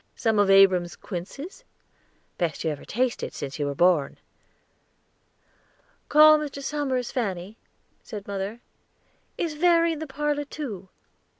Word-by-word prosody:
"Some 220 Hz, -2 st, +1 dB
of 205 Hz, -1 st, +3 dB
Abram's 185 Hz, -4 st, +5 dB
quinces?" 275 Hz, -, -8 dB, 0.8 s
"Best 170 Hz, -3 st, -1 dB
you 160 Hz, -, 0 dB
ever 145 Hz, -, -7 dB
tasted, 250 Hz, +1 st, -2 dB
since 140 Hz, +2 st, -6 dB
you 145 Hz, -, 0 dB
were 140 Hz, -, -3 dB
born." 170 Hz, -3 st, +2 dB, 1.9 s
"Call 305 Hz, +1 st, +7 dB
Mr. 280 Hz, -2 st, -6 dB
Somers, 270 Hz, -4 st, -2 dB
Fanny," 200 Hz, -4 st, -3 dB, 0.5 s
said 210 Hz, -3 st, -8 dB
mother. 200 Hz, +3 st, -4 dB, 0.8 s
"Is 330 Hz, -3 st, -2 dB
Verry 335 Hz, +1 st, +3 dB
in 310 Hz, -, -6 dB
the 315 Hz, -, -5 dB
parlor, 290 Hz, +1 st, -2 dB
too?" 220 Hz, -11 st, -7 dB
225 Hz, 125 wpm, -25 LUFS, 185-295 Hz, 1.9 s, Call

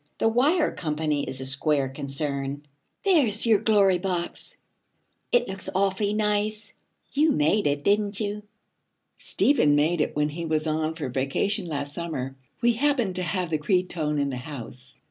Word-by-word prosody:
The -, -, +2 dB
Wire 290 Hz, +9 st, +3 dB
Company 150 Hz, -2 st, -1 dB
is 130 Hz, -, -4 dB
a -, -, -4 dB
square 135 Hz, +1 st, +2 dB
concern. 140 Hz, +1 st, -4 dB, 0.4 s
There's 270 Hz, -, +3 dB
your 220 Hz, -3 st, +5 dB
Glory 200 Hz, -4 st, +3 dB
Box! 180 Hz, -2 st, -4 dB, 0.7 s
It 245 Hz, 0 st, +3 dB
looks 190 Hz, 0 st, -4 dB
awfully 200 Hz, +1 st, +1 dB
nice. 210 Hz, 0 st, -1 dB, 0.4 s
You 300 Hz, +2 st, +3 dB
made 155 Hz, +6 st, +2 dB
it, 145 Hz, 0 st, -1 dB
didn't 205 Hz, +1 st, +1 dB
you?' 210 Hz, -1 st, -3 dB, 0.8 s
'Stephen 150 Hz, -, +3 dB
made 155 Hz, +3 st, +2 dB
it -, -, -1 dB
when 150 Hz, 0 st, +1 dB
he 165 Hz, +3 st, -5 dB
was 155 Hz, 0 st, 0 dB
on 155 Hz, 0 st, -1 dB
for 160 Hz, -, -7 dB
his 130 Hz, -3 st, -4 dB
vacation 180 Hz, -, 0 dB
last 145 Hz, -2 st, -4 dB
summer. 140 Hz, -6 st, -4 dB, 0.3 s
We 240 Hz, 0 st, +5 dB
happened 240 Hz, -7 st, +1 dB
to -, -, -1 dB
have 180 Hz, -1 st, -2 dB
the 155 Hz, -, +1 dB
cretonne 165 Hz, -2 st, 0 dB
in 140 Hz, -1 st, 0 dB
the 130 Hz, -, -4 dB
house. 130 Hz, -1 st, -9 dB
170 Hz, 165 wpm, -25 LUFS, 145-210 Hz, 0.8 s, your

